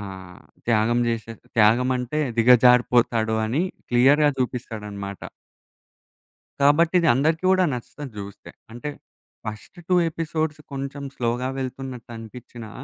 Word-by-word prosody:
ఆహ్, 95 -3 -9 0.3
త్యాగం 115 +1 +2
జేసే 115 0 -3 0.2
త్యాగమంటే 125 +6 +2 0.2
దిగజారిపోతాడు 120 -2 +4
అని 135 +10 0 0.3
క్లియర్‌గా 140 +5 +4
జూపిస్తాడనమాట. 105 -6 -4 1.4
కాబట్టి, 160 +5 +4
ఇది 165 - +2
అందరికీ 160 +7 +1
గూడా 185 -1 +4
నచ్చుతది 135 +3 -8
జూస్తే. 100 0 -9 0.2
అంటే, 120 +5 -6 0.6
ఫస్ట్ 110 - -8
2 185 - +3 0.2
ఎపిసోడ్స్ 155 -1 -3
కొంచెం 140 +1 -5
స్లోగా 125 +1 -1
వెళ్తున్నట్టు 130 -2 -6
అనిపించినా, 115 0 -10
125 Hz, 105 wpm, -23 LUFS, 115-140 Hz, 1.4 s, దిగజారిపోతాడు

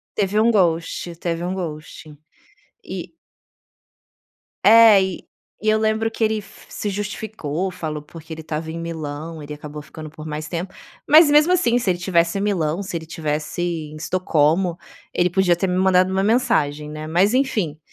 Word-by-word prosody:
Teve 205 +1 0
um 230 - +4
ghosting, 170 -2 0
teve 170 0 -3
um 185 +1 -2
ghosting. 155 -3 -7 0.7
E - - -7 1.5
É, 220 -3 +8
e 190 -1 -4 0.4
e 215 - -1
eu 215 - +3
lembro 220 +1 +1
que 225 - -6
ele 220 0 +2
f - - -17
se 205 - -4
justificou, 195 -4 -4
falou 155 -4 -5
porque 160 +1 -10
ele 160 - -9
estava 160 +1 -4
em 165 - -5
Milão. 160 -1 -6
Ele 150 +1 -7
acabou 150 0 -8
ficando 155 +1 -10
por 155 0 -10
mais 155 0 -5
tempo. 180 +3 -5 0.3
Mas, 310 0 +8
mesmo 300 +4 +5
assim, 245 -9 +2
se 235 - -3
ele 175 - +1
estivesse 170 0 +1
em - - -1
Milão, 180 -3 0
se 190 -2 -7
ele 160 - -5
estivesse 155 +1 -3
em 160 -3 -3
Estocolmo, 170 +1 +1 0.4
ele 175 0 +2
podia 180 -1 +3
ter 190 - 0
me 180 0 -1
mandado 185 0 +4
uma 190 0 0
mensagem, 155 - +1
né? 155 0 -6
Mas 180 +7 +2
enfim, 215 - 0
175 Hz, 175 wpm, -21 LUFS, 155-205 Hz, 1.5 s, É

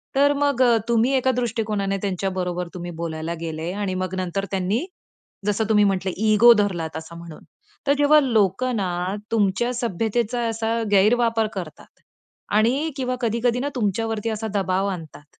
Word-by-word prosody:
तर 285 +1 +4
मग 285 -2 +1
अ, 235 -2 +5
तुम्ही 235 +2 +3
एका 260 0 +2
दृष्टिकोनाने 215 -5 -1
त्यांच्या 195 -1 -1
बरोबर 180 -1 -2
तुम्ही 175 -1 -6
बोलायला 160 0 -3
गेले 160 +1 -4
आणि 200 -1 -3
मग 185 0 -3
नंतर 185 +1 -2
त्यांनी, 195 - 0 0.6
जसं 210 +1 +1
तुम्ही 210 -1 +5
म्हटले 190 -1 0 0.2
इगो 235 +3 +8
धरलात, 175 -7 -1
असं 160 +1 -9
म्हणू. 170 -2 -10 0.5
तर 280 - +5
जेव्हा 290 +1 +6
लोकं 235 0 +1
ना 185 -1 -2 0.2
तुमच्या 225 +3 +1
सभ्यतेचा 235 +1 -1
असा 225 +1 -1
गैरवापर 225 +2 +3
करतात. 175 -6 -7 0.7
आणि 245 +9 +2
किंवा 255 -1 -1
कधी-कधी 235 +1 0
ना 285 - -2
तुमच्यावरती 225 0 -1
असा 220 0 -3
दबाव 195 -1 0
आणतात, 160 -6 -7
210 Hz, 150 wpm, -23 LUFS, 185-235 Hz, 0.7 s, इगो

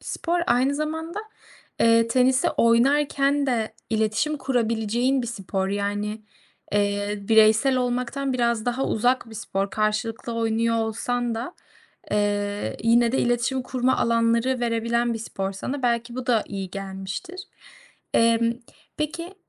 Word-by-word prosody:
spor, 345 +1 -2
aynı 255 +4 +2
zamanda, 320 +5 -3 0.6
eee, 230 0 +4
tenisi 255 +2 +3
oynarken 275 +4 +2
de 230 -4 -1 0.2
iletişim 220 +7 0
kurabileceğin 240 0 0
bir 240 - -4
spor, 195 -4 -3
yani, 205 +2 -2 0.5
eee, 205 0 0
bireysel 220 +5 +4
olmaktan 250 +2 -1
biraz 235 -3 0
daha 245 +2 -1
uzak 245 +1 +1
bir - - -10
spor, 195 -2 -3
karşılıklı 220 +3 -1
oynuyor 230 0 +1
olsan 235 +2 -1
da, 235 +10 -5 0.6
eee, 205 - -1
yine 235 +1 +4
de - - +1
iletişim 245 +2 +1
kurma 255 0 0
alanları 230 +2 +2
verebilen 235 0 0
bir - - -4
spor 195 -3 -4
sana 260 +8 -5
belki 235 0 0
bu 255 0 -5
da 230 -4 +3
iyi 195 -2 -5
gelmiştir. 195 - -6 0.7
Eee, 230 0 +4 0.6
peki, 330 +5 -4
235 Hz, 125 wpm, -24 LUFS, 215-255 Hz, 0.7 s, eee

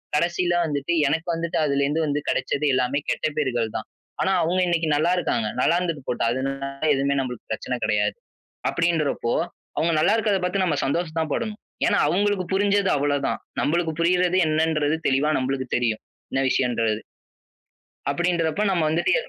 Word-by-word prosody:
கடைசியில 175 +2 +1
வந்துட்டு 145 +1 -1
எனக்கு 160 +4 -1
வந்துட்டு 165 0 -2
அதுல 140 -1 +1
இருந்து 150 +3 0
வந்து 145 -1 0
கிடைச்சது 150 - 0
எல்லாமே 130 +2 +1
கெட்ட - - 0
பெயர்கள் 120 -6 0
தான். 110 - -4 0.3
ஆனா 190 - +2
அவுங்க 175 +3 +1
இன்னக்கி 170 -2 +1
நல்லா 160 +4 +2
இருக்காங்க. 115 -10 0
நல்லா 170 - +3
இருந்தது 165 -5 -2
போட்டும். 115 - +1
அதுனால 135 0 -4
எதுவுமே 140 +1 +1
நமக்குப் 125 -3 -7
பிரச்சன - - -2
கிடையாது. - - +1 0.6
அப்பிடின்றப்போ 160 -8 0 0.4
அவுங்க 165 +1 +2
நல்லா 175 +7 +4
இருக்கிறத 205 -4 +1
பார்த்து 185 +1 +1
நம்ம 175 - 0
சந்தோஷம் 165 +3 -1
தான் 160 -2 -3
படணும். 220 -2 -4 0.3
ஏன்னா 205 - +3
அவுங்களுக்கு 200 0 +1
புரிஞ்சது 200 0 +2
அவ்ள 145 0 +1
தான். - - -2 0.2
நம்மளுக்கு 165 +2 +1
புரியிறது 180 +1 +3
என்னன்றது 155 -1 +1
தெளிவா 140 +3 +2
நம்மளுக்கு 130 0 -2
தெரியும். 115 -3 0 0.3
என்ன 135 - +1
விஷயம்ன்றது. 115 -4 +1 1.1
அப்பிடின்றப்ப 170 +3 0
நம்ம 175 -4 +1
வந்துட்டு, 165 +3 +1
எது - - -11
160 Hz, 160 wpm, -24 LUFS, 140-175 Hz, 1.1 s, நல்லா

